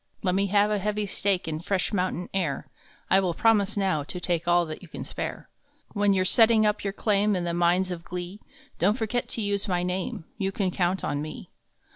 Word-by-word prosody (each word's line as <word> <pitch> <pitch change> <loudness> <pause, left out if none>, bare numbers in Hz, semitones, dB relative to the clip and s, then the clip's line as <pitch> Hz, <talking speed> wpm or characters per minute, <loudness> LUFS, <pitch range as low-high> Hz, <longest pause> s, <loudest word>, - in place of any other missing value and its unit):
Let 180 -2 +2
me 200 +1 +2
have 205 +2 +3
a 210 - +1
heavy 210 +1 -1
stake 195 -2 0
In 155 -1 -2
fresh 190 +4 -1
mountain 180 -2 -1
air 165 -8 -1 0.5
I 190 - +6
will 180 -3 0
promise 210 -1 +3
now 190 -6 +1
to 180 - -6
take 170 -1 -1
All 175 0 +4
that 155 -1 -7
you 180 - -12
can - - -7
spare. - - -5 0.5
When 205 -1 +3
you 190 -1 +3
re - - +1
setting 225 +2 +5
up 210 0 +1
your 200 - -1
claim 205 0 +1
In 180 - -1
the 170 -1 -1
Mines 175 +2 +2
of 170 -2 -5
Glee, 180 +3 -6 0.4
Don 190 +5 +4
t - - -7
forget 235 +1 -1
to 225 - -2
use 200 -1 -1
my 180 -2 0
name 180 -2 -3
You 195 -1 0
can 195 -2 -1
count 180 +1 0
on 145 - -1
me. 155 +1 -8
190 Hz, 225 wpm, -26 LUFS, 175-205 Hz, 0.5 s, I